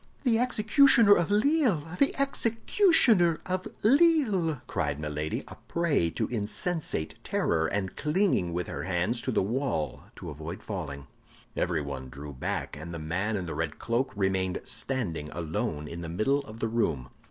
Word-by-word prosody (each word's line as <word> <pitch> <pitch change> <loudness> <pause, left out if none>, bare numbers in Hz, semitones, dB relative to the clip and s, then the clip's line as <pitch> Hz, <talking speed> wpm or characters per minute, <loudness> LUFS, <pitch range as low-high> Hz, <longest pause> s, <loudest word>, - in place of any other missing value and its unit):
"The 235 -4 +3
executioner 235 -1 +6
of 175 -4 +1
Lille, 220 - +2 0.2
the 280 - +3
executioner 230 - +3
of 185 0 -2 0.2
Lille!" 225 - +3
cried 75 -1 -2
Milady, 75 0 -3
a - - -11
prey 165 - +1
to - - -2
insensate 120 - -2
terror, 80 0 0
and 95 0 -3
clinging 150 - +1
with 90 +1 -2
her - - -5
hands 95 +6 0
to 130 - -2
the 110 - +1
wall 115 - -2
to - - -8
avoid 80 +8 -7
falling. 75 -10 -5 0.5
Everyone 70 -6 -2
drew 70 +3 -9
back, 65 - -4
and 80 +3 -7
the - - -4
man 90 +7 -2
in 90 - -4
the 80 - -5
red 80 -1 -3
cloak 120 +3 -1
remained 95 -2 0
standing 90 - -3
alone 80 -1 -3
in 85 +2 -7
the 85 - -6
middle 110 +12 +1
of 110 0 -11
the 115 - +1
room. 80 - -1
110 Hz, 155 wpm, -28 LUFS, -, 0.5 s, executioner